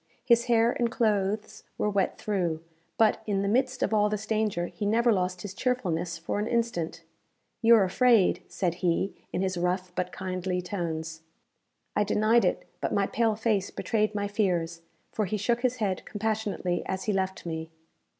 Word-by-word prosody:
His 235 Hz, -1 st, +4 dB
hair 235 Hz, -1 st, +4 dB
and 240 Hz, -1 st, 0 dB
clothes 215 Hz, -2 st, 0 dB
were -, -, 0 dB
wet 200 Hz, -2 st, 0 dB
through; 175 Hz, -6 st, -1 dB, 0.3 s
but, 220 Hz, -1 st, +3 dB
in 200 Hz, -2 st, +1 dB
the -, -, 0 dB
midst 255 Hz, +4 st, +1 dB
of -, -, 0 dB
all 210 Hz, -1 st, +4 dB
this 210 Hz, 0 st, -3 dB
danger, 215 Hz, -5 st, 0 dB
he 210 Hz, -, -7 dB
never 230 Hz, +3 st, +3 dB
lost 180 Hz, -2 st, -1 dB
his 200 Hz, -2 st, -6 dB
cheerfulness 180 Hz, -9 st, -1 dB
for 165 Hz, +5 st, -3 dB
an 210 Hz, -, -1 dB
instant. 175 Hz, -9 st, -1 dB, 0.6 s
"You're 225 Hz, -2 st, +7 dB
afraid," 220 Hz, +1 st, +4 dB
said 180 Hz, -4 st, -1 dB
he, 180 Hz, +2 st, +1 dB, 0.2 s
in 185 Hz, -, -1 dB
his 185 Hz, -2 st, -1 dB
rough 180 Hz, +1 st, -1 dB
but 180 Hz, 0 st, -2 dB
kindly 185 Hz, -1 st, -3 dB
tones. 165 Hz, -3 st, -4 dB, 0.7 s
I 210 Hz, -, +3 dB
denied 215 Hz, +3 st, +3 dB
it; -, -, -1 dB
but -, -, -1 dB
my 200 Hz, -, +2 dB
pale 225 Hz, +1 st, +1 dB
face 215 Hz, -3 st, 0 dB
betrayed 215 Hz, -2 st, -1 dB
my 205 Hz, 0 st, 0 dB
fears, 175 Hz, -5 st, 0 dB, 0.3 s
for 215 Hz, -, -1 dB
he 210 Hz, +3 st, -2 dB
shook 235 Hz, +4 st, 0 dB
his 255 Hz, -1 st, +1 dB
head 200 Hz, -6 st, -1 dB
compassionately 210 Hz, -4 st, -2 dB
as 190 Hz, 0 st, -2 dB
he 210 Hz, -, 0 dB
left 190 Hz, -1 st, -2 dB
me. 160 Hz, -1 st, -4 dB
205 Hz, 175 wpm, -28 LUFS, 180-220 Hz, 0.7 s, You're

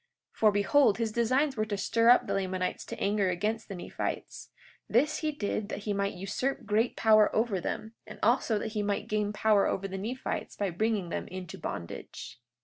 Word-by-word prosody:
43:8 -, -, -28 dB
For 215 Hz, -1 st, +6 dB
behold, 205 Hz, +3 st, +4 dB
his 225 Hz, -2 st, -1 dB
designs 255 Hz, +5 st, +1 dB
were 215 Hz, -1 st, 0 dB
to 205 Hz, -2 st, -3 dB
stir 230 Hz, +4 st, +2 dB
up 245 Hz, -, +6 dB
the -, -, -2 dB
Lamanites 185 Hz, -1 st, -2 dB
to -, -, -7 dB
anger 200 Hz, -1 st, +1 dB
against 215 Hz, +5 st, -2 dB
the 195 Hz, -, -6 dB
Nephites; 175 Hz, -, -5 dB, 0.4 s
this 285 Hz, +7 st, +2 dB
he 310 Hz, -1 st, -1 dB
did 215 Hz, -6 st, -3 dB
that -, -, -4 dB
he 210 Hz, -, -1 dB
might 200 Hz, 0 st, -1 dB
usurp 200 Hz, +9 st, -2 dB
great 225 Hz, +3 st, +1 dB
power 215 Hz, -1 st, +5 dB
over 215 Hz, -4 st, +1 dB
them, 220 Hz, +5 st, -4 dB
and -, -, -9 dB
also 230 Hz, -1 st, +3 dB
that 220 Hz, -, -3 dB
he 210 Hz, -1 st, -1 dB
might 205 Hz, -1 st, -1 dB
gain 210 Hz, -1 st, 0 dB
power 210 Hz, -1 st, +3 dB
over 195 Hz, +1 st, -1 dB
the 195 Hz, 0 st, -5 dB
Nephites 240 Hz, +6 st, -4 dB
by 200 Hz, -3 st, -1 dB
bringing 205 Hz, 0 st, 0 dB
them -, -, -4 dB
into 185 Hz, -2 st, -7 dB
bondage. 85 Hz, +6 st, -7 dB
210 Hz, 200 wpm, -29 LUFS, 195-230 Hz, 0.4 s, For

